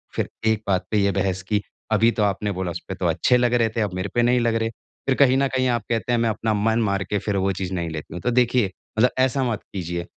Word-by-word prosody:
फिर - - -1 0.2
एक 110 -1 +2
बात 95 -2 +1
पे 105 - +2
ये 100 0 +3
बहस 95 -1 -1
की, 105 +1 0 0.3
अभी 115 +2 +4
तो 110 -3 0
आपने 105 +1 0
बोला 90 -2 -3
उसपे - - -6
तो - - -3
अच्छे 125 - +3
लग 120 0 +2
रहे 115 -2 +3
थे, 115 - +1
अब 100 -4 -1
मेरे 95 +1 -3
पे 120 - +4
नहीं 125 +1 +3
लग 115 -1 +1
रहे, 115 0 0
फिर 130 +3 -5
कहीं 135 -2 +4
न 135 0 +2
कहीं 130 0 +2
आप 120 -2 +1
कहते 115 +1 -1
हैं 120 - +2
मैं 115 -1 +2
अपना 110 0 -1
मन 110 +2 +1
मार 100 -2 0
के 105 - +1
फिर 100 +1 -2
वो 95 +1 +1
चीज़ 95 0 -4
नहीं 85 -2 -2
लेती 80 -1 -7
हूँ 90 - -6
,तो 125 - 0
देखिए, 120 -4 +2 0.3
मतलब 125 +3 +4
ऐसा 130 +1 +2
मत 105 - -3
कीजिए। 85 -2 -3
110 Hz, 280 wpm, -23 LUFS, 95-120 Hz, 0.3 s, अभी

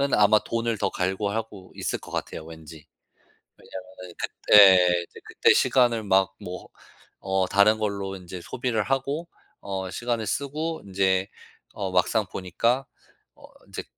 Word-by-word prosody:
아마 105 0 +5
돈을 115 -1 -2
더 100 -1 0
갈구하고 100 +1 -3
있을 - - -3
것 - - -13
같아요, 80 - -5
왠지. 80 -1 -12 0.7
왜냐하면은 95 -1 -11
그때 90 -4 +5
이제 - - -14
그때 - - +3
시간을 120 -4 +2
막 95 -1 +2
뭐 90 +1 -8 0.6
어 95 -1 +1
다른 105 +3 +4
걸로 100 -2 -3
인제 90 -1 -9
소비를 120 +1 -2
하고 140 - -2 0.3
어 95 -2 -5
시간을 120 -1 -2
쓰고 155 +6 -3
인제 95 -1 +1 0.5
어 95 -2 -4
막상 100 +4 +2
보니까 115 +8 -1 0.5
어 - - -16 0.2
인제 - - -7
100 Hz, 265 characters per minute, -25 LUFS, 95-115 Hz, 0.7 s, 아마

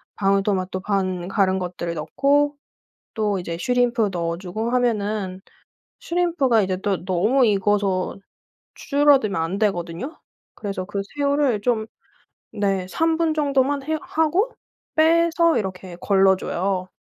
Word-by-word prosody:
방울토마토 195 -1 0
반 185 -3 -1
갈은 190 -1 +1
것들을 175 -2 -4
넣고 285 - +1 0.6
또 210 -4 0
이제 170 -1 -5
슈림프 245 -1 +1
넣어주고 180 +6 -3
하면은 210 -6 -1 0.6
슈림프가 330 -10 +1
이제 185 -1 -1
또 195 -2 -2
너무 210 +9 +2
익어서 200 -2 +1 0.6
줄어들면 280 - +3
안 165 +4 -2
되거든요. 195 - -2 0.4
그래서 195 -3 -4
그 200 0 -3 0.2
새우를 280 -6 +1
좀 220 -1 0 0.7
네 195 -3 -1
3 325 - +1
분 325 -2 +1
정도만 280 -1 +1
해 315 +3 -1
하고 335 +10 0 0.4
빼서 335 +1 +3
이렇게 185 -3 -6
걸러줘요. 190 -1 +1
205 Hz, 255 characters per minute, -22 LUFS, 185-275 Hz, 0.7 s, 줄어들면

